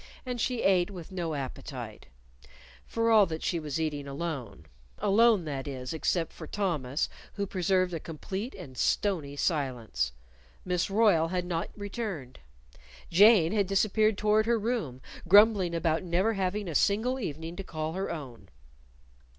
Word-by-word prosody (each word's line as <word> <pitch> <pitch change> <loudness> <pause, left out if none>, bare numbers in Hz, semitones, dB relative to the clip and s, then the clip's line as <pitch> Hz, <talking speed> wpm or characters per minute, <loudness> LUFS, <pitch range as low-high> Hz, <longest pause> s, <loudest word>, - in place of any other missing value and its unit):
And 250 -2 -3
she 250 -3 -1
ate 180 -2 +3
with 180 -3 -9
no 170 -4 -3
appetite 135 -3 -7 0.8
for 230 0 +1
all 215 -3 +6
that 160 -1 -5
she 170 - 0
was 150 -1 -3
eating 150 -3 -2
alone 140 - -5 0.3
alone, 215 -2 +4
that 140 -2 -4
is, 130 -1 -5
except 165 +1 -1
for 160 - -9
Thomas, 155 -9 -1 0.3
who 200 - -2
preserved 185 -1 +1
a 165 - -2
complete 190 - -6
and 155 -9 -10
stony 155 -3 0
silence. 125 - -1 0.5
Miss 180 +1 0
Royle 195 -6 +4
had 180 +1 -2
not 170 -1 -2
returned. 200 - -5 0.7
Jane 190 -2 +6
had 205 -3 +1
disappeared 215 +2 +2
toward 215 +1 +2
her 235 0 +3
room, 210 - -2 0.3
grumbling 200 -2 +6
about 165 -1 +1
never 185 +5 +1
having 195 0 -2
a 165 - -4
single 225 - +2
evening 165 - -5
to 195 - -4
call 155 -3 -4
her 190 +2 -3
own. 130 - -7
180 Hz, 150 wpm, -29 LUFS, 155-205 Hz, 0.8 s, all